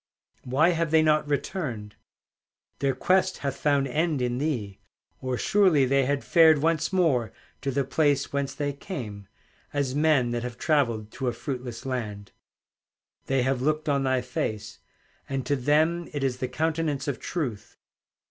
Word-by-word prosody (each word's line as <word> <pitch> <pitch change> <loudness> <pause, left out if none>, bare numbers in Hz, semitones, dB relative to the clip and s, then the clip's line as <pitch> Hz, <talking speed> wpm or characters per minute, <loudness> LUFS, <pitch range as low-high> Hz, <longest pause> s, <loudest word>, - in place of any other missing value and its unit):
Why 140 +7 +3
have 165 -2 0
they 160 0 +4
not 155 -1 +3
returned? 125 - -3 0.8
Their 135 -2 +1
quest 185 +6 +2
hath 135 -1 -1
found 140 -1 +1
end 155 +3 0
in 125 0 -1
thee, 120 -10 -2 0.4
Or 130 -1 -2
surely 185 - +4
they 135 +1 +2
had 140 +1 0
fared 160 -2 +6
Once 160 +2 +1
more 140 - +2 0.3
to 140 - -2
the 135 +1 0
place 145 +1 +1
whence 140 -1 -2
they 145 -1 -2
came, 115 - -7 0.5
As 140 -3 0
men 145 -5 +3
that 120 0 -1
have 120 0 -6
travelled 120 -9 0
to 135 - -4
a 120 - 0
fruitless 125 -2 -6
land. 110 -6 -4 1.0
They 135 -1 +2
have 130 -1 0
looked 155 +3 0
on 140 -2 +2
thy 130 -1 +1
face, 110 -3 -4 0.5
And 135 -2 -2
to 145 - +1
them 155 +6 +2
it 145 -2 -2
is 130 -2 0
the 130 -1 -2
countenance 155 +1 -1
of 140 - -2
Truth. 130 - -4
140 Hz, 160 wpm, -26 LUFS, 125-155 Hz, 1.0 s, fared